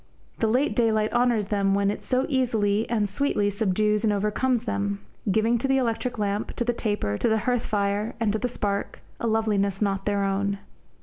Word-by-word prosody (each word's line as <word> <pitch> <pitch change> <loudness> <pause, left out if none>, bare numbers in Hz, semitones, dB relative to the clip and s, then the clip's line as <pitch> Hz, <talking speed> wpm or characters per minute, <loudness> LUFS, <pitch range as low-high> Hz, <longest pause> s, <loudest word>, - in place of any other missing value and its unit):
The 225 - +2
late 255 +7 +1
daylight 220 -3 +2
honours 240 -4 +2
them 195 -1 +2
when 200 0 +2
it - - -6
so 255 +1 +1
easily 225 -6 +1
and 215 -3 +1
sweetly 205 -1 0
subdues 210 +1 +1
and 215 - +3
overcomes 210 +4 0
them, 200 -3 -2 0.3
giving 225 +4 +2
to 270 - -1
the 270 0 +3
electric 245 0 -1
lamp, 205 0 -2
to - - 0
the 240 - +1
taper, 205 - -1
to - - +2
the 220 - +3
hearth 245 -2 0
fire, 205 +1 -1
and 220 -3 +1
to 220 - -1
the 250 - 0
spark, 200 -4 -3 0.2
a 235 - -1
loveliness 205 -3 +1
not 195 -2 -1
their 200 -1 +1
own. 200 +1 0
215 Hz, 195 wpm, -25 LUFS, 200-235 Hz, 0.3 s, and